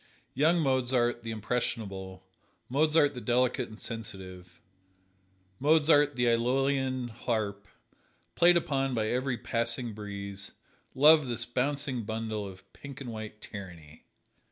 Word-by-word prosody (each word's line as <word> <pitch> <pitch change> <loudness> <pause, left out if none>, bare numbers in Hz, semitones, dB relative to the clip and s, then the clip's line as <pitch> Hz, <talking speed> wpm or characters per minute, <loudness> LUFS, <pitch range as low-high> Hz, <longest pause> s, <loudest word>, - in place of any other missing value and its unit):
Young 160 +6 +3
Mozart, 125 -3 +1
the 115 - -7
impressionable, 100 -4 -3 0.4
Mozart 150 +2 +3
the 125 - -7
delicate 125 0 +1
and 110 - -11
sensitive, 95 -6 -8 1.0
Mozart 145 0 +4
the 125 0 +1
Æolian 130 +1 +1
harp, 105 -3 -3 0.7
played 175 0 +5
upon 135 -5 0
by 110 -1 0
every 125 0 0
passing 115 +1 -2
breeze, 100 -1 -7 0.4
loved 150 +1 +6
this 120 0 -2
bouncing 135 +1 -1
bundle 110 -1 -3
of 95 0 -13
pink 140 -1 -10
and 130 -4 -6
white 110 -1 -8
tyranny. 85 -7 -10
120 Hz, 115 wpm, -29 LUFS, 105-135 Hz, 1.0 s, loved